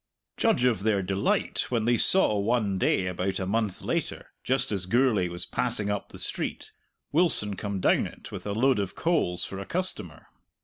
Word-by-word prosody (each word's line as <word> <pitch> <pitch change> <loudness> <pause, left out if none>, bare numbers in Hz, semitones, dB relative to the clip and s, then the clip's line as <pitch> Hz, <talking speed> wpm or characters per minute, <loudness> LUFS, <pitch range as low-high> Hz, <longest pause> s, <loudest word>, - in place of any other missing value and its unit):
Judge 125 - +2
of 120 -5 +2
their 100 -2 +1
delight 95 +2 0
when 115 -3 0
they 120 +1 +3
saw 185 - +5
one 105 -2 0
day 95 - +2
about 90 +1 -2
a 95 - -2
month 105 0 -1
later, - - -3
just 130 -1 +1
as 95 -3 -1
Gourlay 115 -4 +2
was 85 0 -5
passing 110 -4 -1
up 100 - -4
the - - -11
street, - - -4 0.4
Wilson 145 - +2
come 100 -1 -4
down - - +2
it - - -12
with - - -7
a 100 - -2
load 125 +2 +2
of 100 -2 -3
coals 90 - 0
for 95 - -7
a 100 - -6
customer! 185 +1 -5
105 Hz, 185 wpm, -27 LUFS, 95-125 Hz, 0.4 s, saw